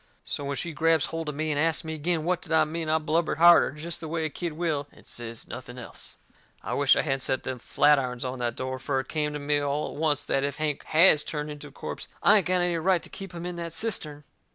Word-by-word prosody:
So 145 - -3
when 140 0 -2
she 170 +6 -3
grabs 165 0 +3
holt 165 -1 -4
of 150 - -5
me 155 +1 -1
and 145 - 0
asts 165 +2 +1
me 160 0 -4
agin 160 +1 -1
what 180 +1 0
did 165 - -11
I 160 - +5
mean 160 +1 -4
I 160 - +4
blubbered 160 +1 0
harder, 170 -3 +7
jest 155 +2 -5
the 160 - -6
way 160 0 -2
a - - -1
kid 170 0 -4
will, 155 -3 -1
and - - -19
says 115 -1 -6
nothing 120 +1 -8
else. 125 - -9 0.5
I - - -3
wisht - - +4
I - - +1
hadn't 135 0 0
set 130 0 -1
them 130 -1 -4
flatirons 130 -2 +2
on 125 0 -4
that 120 -1 -1
door, 130 0 -4
fur 135 0 -1
it 130 - -16
come 150 -1 -1
to - - -3
me 145 0 +1
all 145 +1 -2
at 150 - -6
oncet 145 -2 +1
that - - +3
even 135 - +1
if 140 - -6
Hank 155 -2 -2
HAS 155 -2 +5
turned 150 -1 -4
into 150 0 -8
a - - -14
corpse - - -7 0.2
I 215 - +7
ain't 195 - +1
got 180 0 +3
any 175 -1 +1
right 180 +1 +2
to - - -7
keep 195 -2 -8
him 170 -1 -7
in 180 -1 -4
that 170 -2 -5
cistern. 155 -9 -1
155 Hz, 270 wpm, -27 LUFS, 140-165 Hz, 0.5 s, harder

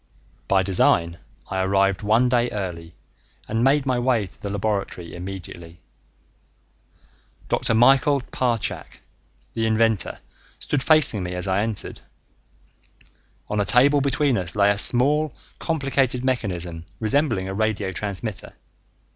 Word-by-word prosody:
By 95 -1 +3
design, 85 -3 +1 0.3
I 95 - -1
arrived 95 0 +1
one 110 +4 +3
day 120 -1 +1
early 85 -6 -6 0.5
and 115 +2 -1
made 140 +2 +3
my 130 -2 0
way 120 -4 +1
to 95 - -16
the 100 - -4
laboratory 100 -4 -3
immediately. 85 -2 -8 1.7
Dr. 115 - +1
Michael 135 +4 +4
Parchak, 120 -4 -2 0.5
the 115 -1 -1
inventor, 110 -2 +1 0.4
stood 145 - -2
facing 155 -9 +3
me 90 0 -4
as 90 +2 0
I 95 +1 +1
entered. 110 -1 -4 1.5
On 105 - -2
a - - +3
table 140 +7 +4
between 140 -3 +2
us 90 0 -3
lay 100 0 +4
a 100 - -1
small 145 +7 +2 0.2
complicated 135 -5 0
mechanism 90 -10 -2 0.2
resembling 115 -4 0
a 95 - -4
radio 105 -2 -1
transmitter. 100 +2 -5
110 Hz, 125 wpm, -23 LUFS, 95-130 Hz, 1.7 s, Michael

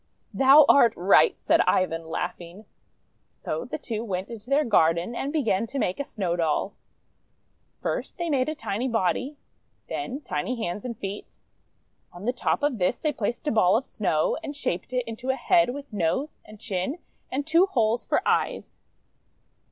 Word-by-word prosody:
'1 - - -9
"Thou 290 +2 +9
art 235 -5 +6
right!" 185 +3 +4
said - - +3
Ivan, 165 -3 +1
laughing. 175 +4 -5 0.6
So - - -5
the - - -5
two 225 -1 -4
went 190 -4 -4
into 230 0 -10
their 290 +2 +3
garden, 170 -2 +2
and 270 +4 -3
began 230 -8 0
to 275 - -6
make 185 -5 -1
a - - 0
Snow 190 -10 -2
Doll. 170 +3 0 1.1
First - - -3
they 345 - -2
made 275 -3 +1
a 310 - -3
tiny 225 0 -3
body, 250 +5 -1 0.5
then 280 -4 -4
tiny 255 -1 -3
hands 205 -1 -4
and 235 -3 -5
feet. 200 0 -7 0.8
On 175 +3 -10
the 245 - +1
top 265 +3 -1
of 280 -6 0
this 180 +6 +1
they 305 -2 -1
placed 235 +7 -3
a - - +2
ball 215 -3 +4
of 265 - -3
Snow, 180 - 0
and 290 - -6
shaped 185 -8 -3
it 250 -1 0
into 230 +3 -6
a 265 - +2
head 235 -2 +3
with 280 -1 -7
nose 205 - -1
and 215 -1 -13
chin 205 - -3 0.3
and 275 +2 -2
two 335 +5 +4
holes 235 - +1
for - - 0
eyes. - - -1
230 Hz, 175 wpm, -26 LUFS, 190-275 Hz, 1.1 s, Thou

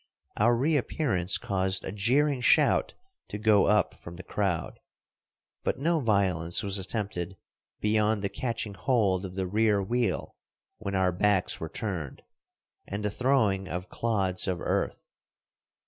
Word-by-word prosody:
Our 120 +3 +3
reappearance 125 - +1
caused 95 -1 0
a - - -4
jeering 130 +7 +2
shout - - +3 0.3
to - - -5
go 105 -2 +4
up 105 -2 +3
from 85 - -11
the 95 - -9
crowd; 95 -4 -2 0.8
but - - -1
no 165 +4 +1
violence 95 - +1
was 100 0 -1
attempted 95 -2 -4 0.4
beyond 105 0 +2
the - - +1
catching 115 -4 -3
hold 95 -2 +1
of 90 - -12
the 95 -1 -1
rear 105 +2 +2
wheel 115 -1 -1 0.4
when 100 -2 -4
our 95 -1 +2
backs 95 +1 +1
were 80 - -5
turned, 90 - -5 0.6
and 100 +2 -4
the 105 - 0
throwing 105 -6 +1
of 90 +2 -5
clods 100 -6 0
of 90 -2 -1
earth. - - -2
100 Hz, 140 wpm, -28 LUFS, 95-115 Hz, 0.8 s, go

